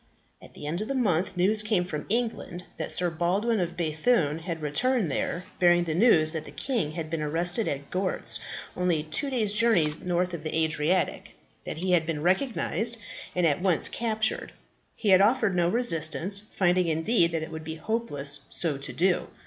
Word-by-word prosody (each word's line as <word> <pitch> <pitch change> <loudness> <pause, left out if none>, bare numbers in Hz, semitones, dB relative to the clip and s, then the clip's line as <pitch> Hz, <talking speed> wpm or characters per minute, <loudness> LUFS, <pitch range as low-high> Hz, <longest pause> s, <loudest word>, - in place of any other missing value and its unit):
At - - -16
the - - -9
end 165 +6 -3
of 215 - -5
a 275 - -2
month, 190 -6 0
news 205 +4 +4
came 215 -4 0
from 155 -4 -6
England 220 -6 -3
that - - -4
Sir 175 -1 +1
Baldwin 195 +7 0
of 175 -1 -3
B‚thune 160 0 0
had 165 -1 -6
returned 205 - 0
there, 170 +5 -3 0.2
bearing 175 -1 +4
the 165 -2 -3
news 165 -5 +4
that 160 -2 -4
the - - -9
King 225 - -2
had 160 -1 -4
been 165 -2 -2
arrested 175 +7 0
at 140 0 -5
Gortz, 185 0 +1 0.4
only 175 -4 0
two 155 - 0
days' 220 -6 0
journey 210 -9 +3
north 180 0 -1
of 170 - -5
the 155 +1 -3
Adriatic 160 +3 -1 0.3
that - - -3
he 185 +3 -2
had 165 -3 +2
been 155 -3 -3
recognized, 225 +3 +1 0.4
and 180 -1 +1
at 155 +1 +1
once 185 -3 +3
captured. 220 -2 -2 0.4
He 215 - -2
had 190 0 +6
offered 220 -1 +2
no 175 -1 +2
resistance, 190 -3 +2
finding 180 -1 +2
indeed 170 +3 +2
that 160 -1 -1
it 160 - -8
would 160 0 -7
be 160 0 -6
hopeless 155 -8 0
so 160 -5 +1
to 140 - -5
do. 180 +1 +1
175 Hz, 190 wpm, -26 LUFS, 160-215 Hz, 0.4 s, had